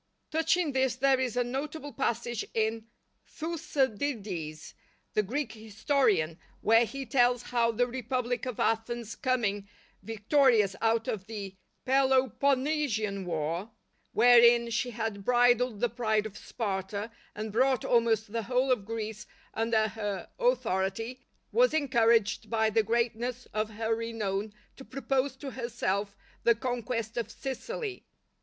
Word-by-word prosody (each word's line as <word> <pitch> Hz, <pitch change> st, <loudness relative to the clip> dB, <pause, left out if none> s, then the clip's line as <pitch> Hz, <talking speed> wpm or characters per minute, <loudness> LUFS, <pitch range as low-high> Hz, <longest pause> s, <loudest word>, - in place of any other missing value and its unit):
Touching 320 Hz, 0 st, +2 dB
this 260 Hz, -2 st, +1 dB
there 265 Hz, 0 st, +3 dB
is 250 Hz, -2 st, -1 dB
a 245 Hz, -, +3 dB
notable 290 Hz, +4 st, -5 dB
passage 235 Hz, -3 st, -1 dB
in 220 Hz, 0 st, 0 dB, 0.4 s
Thucydides, 235 Hz, -, -3 dB, 0.4 s
the 215 Hz, -, +3 dB
Greek 260 Hz, +8 st, -3 dB
historian, 215 Hz, -, 0 dB, 0.2 s
where 225 Hz, +2 st, +5 dB
he 275 Hz, +3 st, -6 dB
tells 245 Hz, 0 st, +3 dB
how 235 Hz, -1 st, +1 dB
the 240 Hz, +2 st, +1 dB
republic 245 Hz, 0 st, -2 dB
of 250 Hz, -, -5 dB
Athens 225 Hz, 0 st, -1 dB
coming 215 Hz, -7 st, -1 dB, 0.3 s
victorious 225 Hz, -2 st, +3 dB
out 225 Hz, 0 st, +2 dB
of 195 Hz, -2 st, -3 dB
the 200 Hz, -4 st, -6 dB, 0.3 s
Peloponessian 265 Hz, -4 st, +1 dB
war, 165 Hz, +4 st, -2 dB, 0.4 s
wherein 235 Hz, -1 st, +6 dB
she 240 Hz, +2 st, 0 dB
had 220 Hz, -3 st, -4 dB
bridled 245 Hz, -1 st, +3 dB
the 240 Hz, -, +4 dB
pride 220 Hz, -2 st, 0 dB
of 215 Hz, -2 st, -7 dB
Sparta, 205 Hz, 0 st, -4 dB, 0.2 s
and 215 Hz, +1 st, -4 dB
brought 260 Hz, +3 st, +2 dB
almost 225 Hz, -3 st, +2 dB
the 230 Hz, -, 0 dB
whole 250 Hz, +4 st, +1 dB
of 215 Hz, -6 st, +1 dB
Greece 220 Hz, -1 st, -5 dB, 0.3 s
under 225 Hz, -1 st, +1 dB
her 205 Hz, -2 st, -5 dB
authority, 225 Hz, -, 0 dB, 0.3 s
was -, -, +4 dB
encouraged 235 Hz, -7 st, +2 dB
by 220 Hz, -1 st, +2 dB
the 225 Hz, +1 st, +4 dB
greatness 235 Hz, +2 st, -1 dB
of 215 Hz, 0 st, -1 dB
her 220 Hz, +1 st, -1 dB
renown 220 Hz, -3 st, -2 dB, 0.3 s
to 270 Hz, -, -10 dB
propose 270 Hz, 0 st, -1 dB
to 270 Hz, 0 st, -7 dB
herself 210 Hz, -5 st, -2 dB, 0.2 s
the 235 Hz, -, +4 dB
conquest 235 Hz, -2 st, -3 dB
of 230 Hz, -2 st, -2 dB
Sicily. 370 Hz, -, -5 dB
235 Hz, 130 wpm, -29 LUFS, 215-255 Hz, 0.4 s, wherein